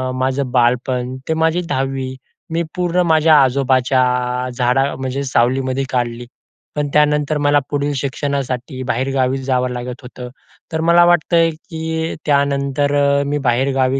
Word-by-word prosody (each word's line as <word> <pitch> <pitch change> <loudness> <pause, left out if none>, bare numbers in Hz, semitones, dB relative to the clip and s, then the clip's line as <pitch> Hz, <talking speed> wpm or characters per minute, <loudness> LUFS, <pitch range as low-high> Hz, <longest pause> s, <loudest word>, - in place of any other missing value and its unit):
माझं 130 0 -1
बालपण, 125 +1 0
ते - - +2
माझी 160 +2 +1
10वी 135 -1 -2 0.4
मी 170 +1 0
पूर्ण 180 0 +1
माझ्या 160 0 +5
आजोबाच्या 130 0 +2 0.6
झाडा 125 +3 +1
म्हणजे 130 +1 -3
सावलीमध्ये 130 +2 +1
काढली. 120 -1 -2 0.5
पण 145 -1 -1
त्यानंतर 150 0 +2
मला 145 0 +3
पुढील 145 0 -1
शिक्षणासाठी 135 -1 -3
बाहेरगावी 130 +1 0
जावं 125 -1 0
लागत 125 0 -6
होतं. 125 0 -9 0.4
तर 160 - -1
मला 170 +1 +5
वाटत 175 0 +2
आहे, 165 0 +4
की 160 0 -5
त्यानंतर 140 -1 +1 0.4
मी 145 +1 0
बाहेरगावी 130 +2 +1
135 Hz, 130 wpm, -18 LUFS, 130-150 Hz, 0.6 s, माझ्या